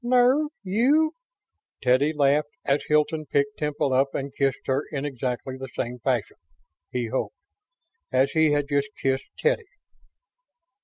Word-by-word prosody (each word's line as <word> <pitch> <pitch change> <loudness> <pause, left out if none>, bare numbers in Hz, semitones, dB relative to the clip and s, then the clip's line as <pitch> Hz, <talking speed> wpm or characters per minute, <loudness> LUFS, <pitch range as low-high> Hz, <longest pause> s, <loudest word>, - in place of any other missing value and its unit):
"Nerve? 255 +4 +4 0.2
You?" 270 - +3 0.7
Teddy 130 +4 +4
laughed 145 0 +2 0.2
as 140 +1 +2
Hilton 150 0 +1
picked 140 +1 0
Temple 145 -3 0
up 135 +1 +2
and 140 0 -3
kissed 135 -1 0
her 135 +2 +1
in 140 -1 -3
exactly 130 -1 -3
the 135 - -5
same 125 0 -3
fashion 120 -4 -1 0.5
he 120 -2 -2
hoped! 135 - -2 0.8
as 130 +1 +3
he 160 -1 +3
had 145 -1 +1
just 140 0 0
kissed 135 0 -1
Teddy. 470 -2 +1
140 Hz, 140 wpm, -25 LUFS, 135-155 Hz, 0.8 s, Nerve